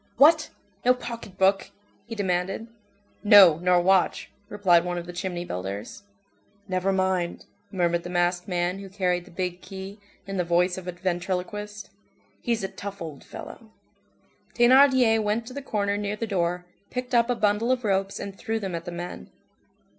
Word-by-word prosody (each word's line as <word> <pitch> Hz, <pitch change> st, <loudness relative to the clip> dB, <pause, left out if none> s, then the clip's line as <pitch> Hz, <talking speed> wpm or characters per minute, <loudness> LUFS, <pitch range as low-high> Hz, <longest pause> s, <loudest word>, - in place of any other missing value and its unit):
"What! 305 Hz, +4 st, +6 dB, 0.3 s
No 250 Hz, +1 st, +5 dB
pocket 230 Hz, -6 st, -8 dB
book?" 195 Hz, +1 st, +2 dB, 0.4 s
he 230 Hz, -, -6 dB
demanded. 190 Hz, +1 st, -1 dB, 0.6 s
"No, 200 Hz, -6 st, +8 dB
nor 180 Hz, 0 st, +3 dB
watch," 190 Hz, +1 st, +2 dB, 0.2 s
replied 185 Hz, -6 st, +3 dB
one 175 Hz, 0 st, -3 dB
of 170 Hz, -, -5 dB
the 175 Hz, -, -8 dB
"chimney 175 Hz, -1 st, -4 dB
builders." 100 Hz, -, -6 dB, 0.7 s
"Never 185 Hz, 0 st, 0 dB
mind," 185 Hz, -2 st, -1 dB, 0.3 s
murmured 175 Hz, -2 st, +1 dB
the 175 Hz, -, -8 dB
masked 175 Hz, +1 st, 0 dB
man 180 Hz, 0 st, -1 dB
who 195 Hz, -1 st, -9 dB
carried 180 Hz, -2 st, -1 dB
the -, -, -15 dB
big 180 Hz, 0 st, -4 dB
key, 195 Hz, +2 st, -9 dB, 0.3 s
in 195 Hz, 0 st, -5 dB
the 180 Hz, -, +1 dB
voice 175 Hz, +1 st, +2 dB
of 185 Hz, -1 st, -8 dB
a -, -, -1 dB
ventriloquist, 185 Hz, +4 st, -4 dB, 0.5 s
"he's 230 Hz, -4 st, -1 dB
a -, -, 0 dB
tough 200 Hz, +1 st, -8 dB
old 155 Hz, -4 st, -8 dB
fellow." 225 Hz, -, -10 dB, 0.9 s
Thénardier 250 Hz, -2 st, +5 dB
went 215 Hz, +2 st, -1 dB
to 255 Hz, -, -9 dB
the 280 Hz, -, -5 dB
corner 205 Hz, -6 st, -1 dB
near 205 Hz, 0 st, -2 dB
the 230 Hz, -, -3 dB
door, 180 Hz, -3 st, -1 dB, 0.2 s
picked 250 Hz, 0 st, -5 dB
up 235 Hz, 0 st, +4 dB
a 245 Hz, -, +2 dB
bundle 215 Hz, +2 st, +1 dB
of 255 Hz, -1 st, 0 dB
ropes 195 Hz, -1 st, 0 dB
and 200 Hz, -1 st, -6 dB
threw 225 Hz, +3 st, -3 dB
them 195 Hz, -4 st, -4 dB
at 170 Hz, 0 st, -4 dB
the 175 Hz, -, -5 dB
men. 175 Hz, -, -7 dB
190 Hz, 170 wpm, -26 LUFS, 175-210 Hz, 0.9 s, No